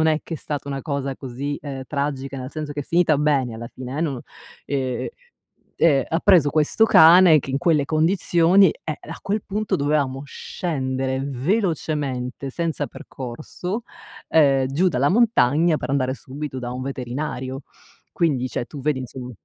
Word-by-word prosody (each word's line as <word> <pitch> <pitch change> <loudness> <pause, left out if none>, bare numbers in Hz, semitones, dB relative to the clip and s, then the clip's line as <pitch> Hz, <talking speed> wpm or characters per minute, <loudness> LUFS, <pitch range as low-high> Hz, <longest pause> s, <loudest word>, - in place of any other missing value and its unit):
non 160 - +3
è 155 -1 +2
che 165 - -5
è - - -4
stata 145 -2 -5
una 135 -1 -4
cosa 140 -3 -3
così 135 +2 -5
ehm 135 -2 -5
tragica, 140 -2 -3
nel 130 +1 -6
senso 150 -1 -5
che 145 - -4
è - - -3
finita 165 0 +2
bene 140 -5 +1
alla 115 +1 -7
fine 130 +2 -7
e - - 0
non 140 -7 -2 0.4
ehm, 130 -2 -2 0.7
e 140 -6 +4
ha 165 - +1
preso 175 -8 +5
questo 155 +9 +3
cane 170 -3 +8
che 135 - -5
in 135 - 0
quelle 155 -3 +2
condizioni 170 +3 +4
eh 155 -2 -4
a 160 - -9
quel 205 +1 -2
punto 210 +2 -1
dovevamo 140 -2 0
scendere 130 -4 -3
velocemente 140 - -2
senza 160 0 -2
percorso 155 - -6 0.5
ehm 135 -4 +4
giù 160 +8 +2
dalla 140 -2 +1
montagna 170 - +3
per - - -4
andare 130 -2 0
subito 135 0 -7
da 120 -1 -5
un 125 - -5
veterinario. 130 0 -4 0.5
Quindi 140 -7 0
cioè, 120 - -3
tu 140 +3 -9
vedi 140 -1 0
insomma 125 0 -7
145 Hz, 165 wpm, -22 LUFS, 130-160 Hz, 0.7 s, cane